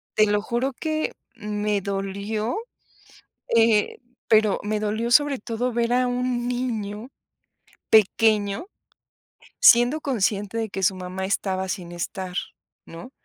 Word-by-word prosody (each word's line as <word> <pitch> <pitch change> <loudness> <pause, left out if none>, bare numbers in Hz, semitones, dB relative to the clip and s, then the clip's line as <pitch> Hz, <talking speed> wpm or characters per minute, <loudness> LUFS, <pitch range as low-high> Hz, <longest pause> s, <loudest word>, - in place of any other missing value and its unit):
te 215 - +5
lo 205 0 +1
juro 240 +5 -2
que 310 -1 -2 0.2
me 210 -2 -2
dolió, 200 - -3 1.0
eh, 225 -2 +3 0.3
pero 215 -3 +4
me 210 +1 -1
dolió 220 +3 -2
sobre 290 0 +4
todo 240 +3 -2
ver 235 0 0
a 250 0 +2
un 245 -1 -1
niño 235 -3 -3 0.8
pequeño 215 - +3 0.9
siendo 245 - +6
consciente 210 -5 -1
de 225 -1 -2
que 195 0 -5
su 190 +1 +3
mamá 185 +1 -5
estaba 190 -1 -1
sin 180 -2 -5
estar, 180 +1 -5 0.5
¿no? 170 +10 -11
215 Hz, 120 wpm, -24 LUFS, 200-240 Hz, 1.0 s, siendo